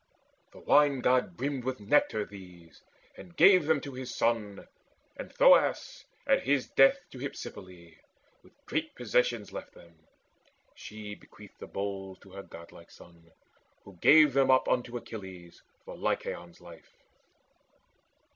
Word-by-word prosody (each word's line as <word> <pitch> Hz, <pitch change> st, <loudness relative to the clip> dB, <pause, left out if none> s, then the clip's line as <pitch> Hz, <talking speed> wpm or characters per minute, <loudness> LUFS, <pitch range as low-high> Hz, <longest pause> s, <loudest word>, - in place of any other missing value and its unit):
The -, -, -17 dB
Wine 145 Hz, -3 st, +3 dB
god 130 Hz, +8 st, +1 dB
brimmed 135 Hz, -1 st, -3 dB
With 130 Hz, -1 st, -4 dB
nectar 105 Hz, -1 st, +1 dB
these, 90 Hz, -5 st, -15 dB, 0.3 s
and 175 Hz, -1 st, -14 dB
gave 185 Hz, -6 st, +6 dB
them 160 Hz, -2 st, +2 dB
to 140 Hz, -, -8 dB
his 130 Hz, -1 st, -7 dB
son; 110 Hz, -4 st, -2 dB, 0.5 s
And -, -, -9 dB
Thoas -, -, +3 dB, 0.2 s
at 275 Hz, -1 st, +2 dB
his 140 Hz, -2 st, 0 dB
death 135 Hz, +6 st, +4 dB
to 130 Hz, -, -11 dB
Hypsipyle 95 Hz, -10 st, -9 dB, 0.5 s
With -, -, -26 dB
great 155 Hz, +1 st, -3 dB
possessions 120 Hz, -2 st, -1 dB
left -, -, -9 dB
them. 85 Hz, -1 st, -17 dB, 0.8 s
She 105 Hz, -1 st, -10 dB
bequeathed -, -, -16 dB
The -, -, -9 dB
bowls 95 Hz, -1 st, -6 dB
to 95 Hz, -, -17 dB
her 100 Hz, +1 st, -9 dB
godlike 85 Hz, -2 st, -14 dB
son, 85 Hz, -1 st, -19 dB, 0.5 s
who 100 Hz, -, -14 dB
gave 150 Hz, -, +6 dB
them 135 Hz, 0 st, +2 dB
up 130 Hz, 0 st, +4 dB
Unto 120 Hz, -1 st, -1 dB
Achilles 95 Hz, -7 st, -11 dB, 0.2 s
for -, -, -9 dB
Lycaon's 85 Hz, -1 st, -4 dB
life. 85 Hz, -2 st, -16 dB
115 Hz, 135 wpm, -29 LUFS, 95-140 Hz, 0.8 s, gave